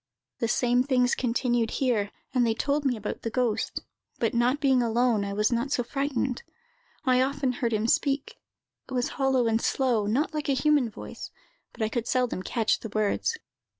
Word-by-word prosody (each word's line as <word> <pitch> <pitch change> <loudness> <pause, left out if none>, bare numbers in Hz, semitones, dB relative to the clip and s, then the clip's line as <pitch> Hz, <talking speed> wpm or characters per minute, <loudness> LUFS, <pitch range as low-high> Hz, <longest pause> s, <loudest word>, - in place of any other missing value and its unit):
The 230 - 0
same 245 +1 +2
things 250 -1 +2
continued 240 -2 0
here, 230 -7 +1 0.2
and 250 -2 +3
they 225 -1 +1
told 285 +4 0
me 250 -3 +1
about 210 -1 -5
the 230 - -3
ghost; 235 -2 -1 0.4
but 230 - 0
not 245 +4 +2
being 265 -3 +3
alone, 235 -2 +2
I 200 - -3
was 210 +3 +1
not 240 +4 -1
so 245 - +1
frightened. 270 -1 -2 0.6
I 255 -1 +4
often 270 0 0
heard 240 -1 -2
him 215 0 0
speak; 280 - 0 0.5
it 260 - -4
was 245 0 0
hollow 265 -3 +1
and 225 0 +1
slow, 240 -6 +1
not 290 - 0
like 300 -1 -3
a - - +4
human 285 -2 +2
voice; - - -9 0.4
but 225 - -4
I 215 - +1
could 235 0 -3
seldom 250 -7 0
catch 225 +3 0
the 225 - -7
words. 215 - 0
245 Hz, 185 wpm, -27 LUFS, 230-270 Hz, 0.6 s, I